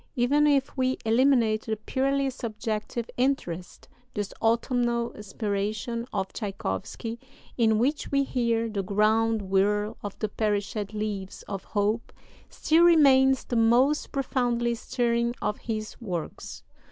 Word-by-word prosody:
Even 285 +4 +3
if 280 -2 +2
we 260 -1 +1
eliminate 230 -2 +3
the 220 - 0
purely 270 +5 0
subjective 225 -1 -4
interest, 215 -10 -2 0.3
this 205 -2 -3
autumnal 235 +1 +1
inspiration 210 +3 -3
of 195 -2 -3
Tschaikowsky, 205 - -4 0.4
in 220 -3 +3
which 275 +7 0
we 275 0 +3
hear 235 -3 0
'the 210 -3 -2
ground 215 +2 +2
whirl 205 +3 +1
of 205 -1 -6
the 215 - -1
perished 205 0 -2
leaves 205 -3 -4
of 195 -2 -6
hope,' 210 +2 -1 0.4
still 325 +2 +3
remains 270 -6 +6
the 245 - -4
most 240 +6 +3
profoundly 245 -3 0
stirring 235 0 0
of 210 - -2
his 215 0 -5
works." 180 -8 -5
230 Hz, 125 wpm, -27 LUFS, 210-255 Hz, 0.4 s, remains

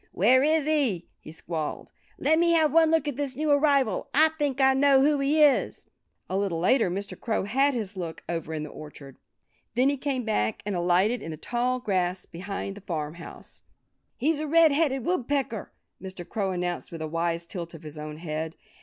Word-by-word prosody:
"Where 245 +8 +4
is 310 +1 +2
he?" 275 - 0
he - - -11
squalled. 160 -1 -5 0.3
"Let 315 +3 +2
me 340 0 +3
have 310 -3 +3
one 325 -1 +5
look 320 -2 +2
at 285 -3 -3
this 280 -3 -2
new 305 +2 0
arrival! 280 -7 +2
I 315 +2 +6
think 290 -4 -2
I 265 0 +5
know 270 0 +4
who 295 0 +3
he 295 +3 +3
is." 290 -3 +2 0.4
A 185 - -3
little 195 -4 -1
later 210 +4 +3
Mr. 195 +3 -4
Crow 225 -4 -2
had 270 +7 +2
his 205 -4 -2
look, 170 -4 -6
over 165 -2 -4
in 155 - -3
the 150 - -7
orchard. 145 -3 -11 0.6
Then 255 +3 +4
he 285 - -1
came 265 -2 -2
back 110 - -1
and 205 -2 -2
alighted 180 +7 +2
in - - -7
the 155 - -6
tall 245 +7 -1
grass 185 -5 -1
behind 195 +3 -6
the 205 - -12
farmhouse. 165 -2 -7 0.6
"He's 295 +4 +1
a 310 - -3
Red 325 +1 +5
headed 280 -4 +1
Woodpecker," 275 - -1 0.3
Mr. 190 -2 -8
Crow 200 -4 -2
announced 175 -1 -3
with 165 -2 -6
a - - -3
wise 165 +1 -2
tilt 170 -1 -7
of 165 - -12
his 150 0 -9
own 150 0 -7
head. 160 0 -4
220 Hz, 200 wpm, -26 LUFS, 170-285 Hz, 0.6 s, I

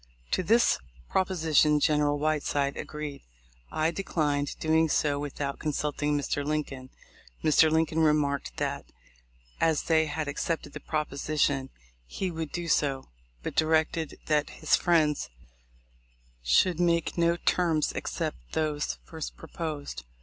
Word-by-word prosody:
To - - +2
this 230 +6 +4 0.3
proposition 160 -5 +3
General 150 -1 +2
Whiteside 145 -2 0
agreed: 150 -2 -6 0.5
I 155 +1 +1
declined 150 -6 -1
doing 160 0 +3
so 145 -1 +1
without 145 -1 -4
consulting 150 -1 -1
Mr. 145 0 -1
Lincoln. 140 -3 -3 0.5
Mr. 155 +1 +5
Lincoln 160 0 +1
remarked 145 - +1
that, - - -2 0.7
as 160 -2 +2
they 160 -1 +3
had 155 0 -3
accepted 145 0 -3
the - - -6
proposition, 145 -2 -1 0.4
he 185 - -3
would 160 -2 -4
do 175 -1 -4
so, 140 -4 +1 0.3
but - - -3
directed 160 0 +1
that 150 -1 +1
his - - +2
friends 155 - +2 1.1
should 155 - +3
make 170 -2 +2
no 170 0 +3
terms 165 -4 +1
except - - -4
those 150 - -1
first - - -7
proposed. 155 - -5
150 Hz, 120 wpm, -28 LUFS, 145-160 Hz, 1.1 s, Mr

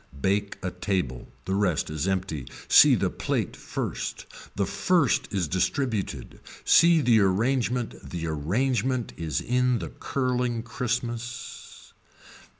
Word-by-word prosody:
Bake 100 +4 0
a 90 - -2
table, 90 -9 -2 0.2
the 95 - -2
rest 90 -6 0
is 75 +3 -2
empty, 90 -8 -2 0.2
see - - +8
the - - 0
plate - - -2
first, - - -4 0.3
the 100 - +1
first 165 - +1
is 95 -5 0
distributed, 105 - -2 0.3
see 170 -1 +6
the 120 -4 +4
arrangement 115 +5 0
the 85 -2 -4
arrangement 115 - -1
is 80 -5 -2
in 125 0 +1
the - - -5
curling 125 -3 -1
Christmas. 120 0 -5
110 Hz, 120 wpm, -26 LUFS, 90-125 Hz, 0.3 s, see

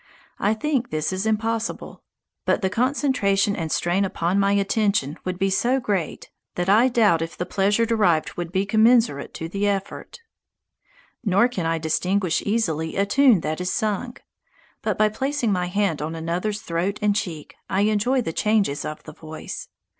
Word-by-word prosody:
I 210 +2 +2
think 265 0 -1
this 155 +2 -2
is 190 +3 -2
impossible; 225 +1 -2 0.4
but - - 0
the 190 - +1
concentration 225 -5 +1
and 160 -3 -4
strain 175 +3 +1
upon 185 0 0
my 200 0 +3
attention 200 -6 +1
would 185 -1 -2
be 195 +1 0
so 245 +7 +2
great 205 -9 -3 0.2
that 175 0 -2
I 220 +6 +5
doubt 215 -9 +3
if 165 +1 -5
the 180 - -2
pleasure 205 +5 +1
derived 205 -9 +1
would 175 -1 -5
be 190 +1 0
commensurate 220 - +3
to 165 - -5
the 200 +4 -1
effort. 200 - -4 1.0
Nor 200 +2 +4
can 185 -10 -3
I 165 0 +1
distinguish 175 +3 0
easily 160 -8 -1
a 200 - +2
tune 245 -3 +4
that 155 +3 -3
is 180 - -1
sung. 220 +3 -2 0.6
But - - -1
by 215 - +4
placing 265 +1 -1
my 180 -2 0
hand 195 -4 0
on 160 +2 -4
another's 180 +6 -2
throat 175 +5 -2
and 210 -1 +1
cheek, 175 -8 -4 0.2
I 190 +1 +1
enjoy 215 +5 +2
the 165 - -4
changes 210 -9 +1
of 155 - -6
the 155 - -10
voice. 155 0 -8
200 Hz, 170 wpm, -23 LUFS, 170-220 Hz, 1.0 s, I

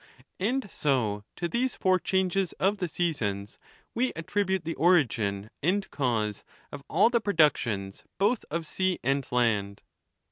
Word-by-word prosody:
And 240 +5 0
so 110 -8 0
to 175 - -2
these 245 +7 -1
four 185 -1 +2
changes 190 0 0
of 200 +2 0
the 180 - -1
seasons 110 - -2 0.3
we 250 +2 0
attribute 190 +2 -1
the 165 - -2
origin 115 - +2
and 190 +6 +1
cause 110 -7 -1 0.3
of 140 - -8
all 200 +8 +4
the 235 -2 +2
productions 130 - +1
both 210 +5 +2
of 165 +1 -3
sea 185 +2 0
and 135 +1 0
land. 105 -5 +1
165 Hz, 140 wpm, -28 LUFS, 115-190 Hz, 0.3 s, all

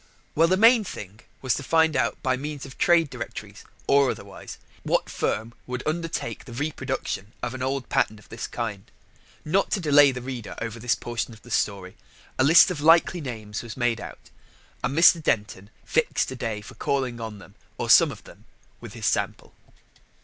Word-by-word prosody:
Well, 165 +2 +4
the 185 +2 +2
main 230 +2 +6
thing 105 - -8 0.2
was 130 -3 +2
to - - -3
find 160 +1 +2
out 115 -4 0
by 130 -1 +2
means 145 +1 -6
of 135 - -11
trade 165 -4 +3
directories, - - -8 0.2
or 140 -1 +4
otherwise, - - -7 0.2
what - - 0
firm 110 +2 -2
would 125 0 -4
undertake 160 -8 -3
the 120 - -10
reproduction 130 -6 -4
of 120 - -2
an 130 - -6
old 135 0 -2
pattern 110 - +1
of 105 - -18
this 115 - -5
kind. 110 -5 -5 0.6
Not 185 +6 +1
to - - +1
delay 145 -4 +6
the 125 - -5
reader 125 -4 -6
over 115 0 -5
this 125 +1 +1
portion 120 -1 -4
of 105 - -20
the 120 - -13
story, 95 -4 -1 0.4
a - - +5
list 165 +6 +7
of 155 -5 -4
likely 165 +2 +4
names 110 -5 -6
was 115 0 -9
made 120 -3 0
out, - - -11 0.5
and 140 - -1
Mr. 170 0 +7
Denton 105 -7 -1 0.2
fixed 160 -4 0
a - - -5
day 115 -3 -4
for 105 - -12
calling 130 -4 -2
on 110 -2 -6
them, 100 0 -15 0.2
or - - -3
some - - +7
of - - -11
them, - - -16 0.3
with - - -10
his - - -6
sample. - - -1
130 Hz, 190 wpm, -25 LUFS, 115-155 Hz, 0.6 s, list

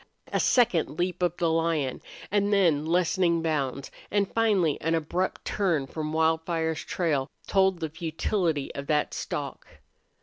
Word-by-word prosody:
A - - +2
second 180 - +2
leap 180 0 -1
of 175 -1 +1
the 170 -2 +1
lion, 160 -5 0 0.3
and 205 0 +2
then 165 -7 +3
lessening 170 0 +2
bounds, 140 -4 -2 0.2
and 200 -1 0
finally 205 -9 +2
an 165 +1 +1
abrupt 170 +4 -2
turn 170 -9 0
from 155 +2 -4
Wildfire's 160 0 0
trail 150 -7 -1 0.2
told 190 -2 +2
the 160 - -2
futility 165 -1 -1
of 140 0 -6
that 150 -1 +1
stalk. - - -5
165 Hz, 140 wpm, -27 LUFS, 155-185 Hz, 0.3 s, then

